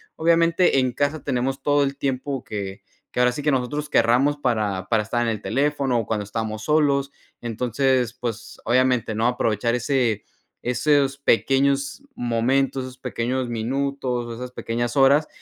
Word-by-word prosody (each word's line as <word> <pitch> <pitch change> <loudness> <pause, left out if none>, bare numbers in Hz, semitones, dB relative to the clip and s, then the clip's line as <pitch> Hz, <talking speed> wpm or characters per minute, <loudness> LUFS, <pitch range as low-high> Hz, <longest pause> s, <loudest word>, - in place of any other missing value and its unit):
obviamente, 165 -1 +3
en 130 -1 +1
casa 145 +4 -1
tenemos 135 0 -1
todo 145 +1 +3
el 140 0 -2
tiempo 135 -1 -2
que 100 -1 -6 0.3
que - - -3
ahora 125 0 +4
sí, 145 +4 -6
que 150 - +2
nosotros 145 +3 -1
queramos 125 +6 +3
para 105 -8 -1
para 110 -2 +2
estar 120 +3 -1
en 120 - 0
el 110 -2 -1
teléfono, 140 -3 +1
o 115 - -4
cuando 105 -2 -1
estamos 110 +1 -4
solos. 140 -2 +2 0.3
Entonces, 125 +1 0
pues, 115 -3 -6
obviamente, 125 -1 +2
¿no?, 110 +2 +1
aprovechar 115 -1 0
ese 120 -4 0 0.4
esos 140 +3 +2
pequeños 140 - +2
momentos, 130 +3 0
esos 130 0 -10
pequeños 125 0 -2
minutos, 125 0 -2
esas 125 +2 -7
pequeñas 120 -1 -3
horas 140 +3 +5
125 Hz, 150 wpm, -23 LUFS, 115-140 Hz, 0.4 s, horas